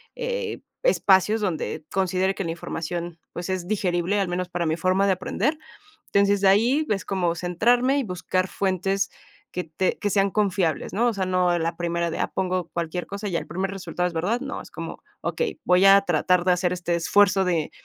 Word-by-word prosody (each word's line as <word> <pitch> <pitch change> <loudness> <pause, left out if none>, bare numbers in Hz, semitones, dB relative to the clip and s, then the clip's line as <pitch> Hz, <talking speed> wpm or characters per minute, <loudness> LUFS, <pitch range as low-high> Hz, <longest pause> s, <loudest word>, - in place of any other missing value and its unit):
eh, 485 -1 -3 0.2
espacios 210 - +4
donde 160 -5 -3
considere 190 0 +1
que - - -3
la 165 - -2
información, 170 0 -5
pues 175 - -5
es 185 -2 -2
digerible, 185 -1 0
al 195 - +1
menos 180 0 -3
para 175 -1 -2
mi 160 0 +1
forma 185 +3 +2
de 195 - +4
aprender. 220 - -1 0.6
Entonces, 200 0 +3
de 195 - +2
ahí 240 +10 +4
ves 200 -2 -1
como 180 -4 0
centrarme, 240 - +2
y 275 - 0
buscar 185 -1 -1
fuentes 195 +1 -1 0.4
que 180 - -3
te 165 +4 -1
que 205 - -1
sean 195 0 +2
confiables, 190 -6 0
¿no? 235 +4 +2
O - - +1
sea, 195 -3 -2
no 180 -1 +2
la 165 +1 -2
primera 170 0 -1
de, - - -4
ah, - - 0
pongo 185 -2 -1
cualquier 170 +1 -3
cosa 200 +1 -5
y 180 - -4
el - - -3
primer 190 +4 -2
resultado 180 -2 -2
es 175 - -4
verdad, 190 +9 0
no, 275 +1 -5
es - - -15
como: - - -7 0.2
"Okey, 470 -7 -2
voy 180 +2 +4
a 195 0 +8
tratar 180 0 +2
de 180 - +4
hacer 180 0 +1
este 175 -1 -2
esfuerzo 195 +3 +3
de 170 -4 0
185 Hz, 200 wpm, -24 LUFS, 175-200 Hz, 0.6 s, a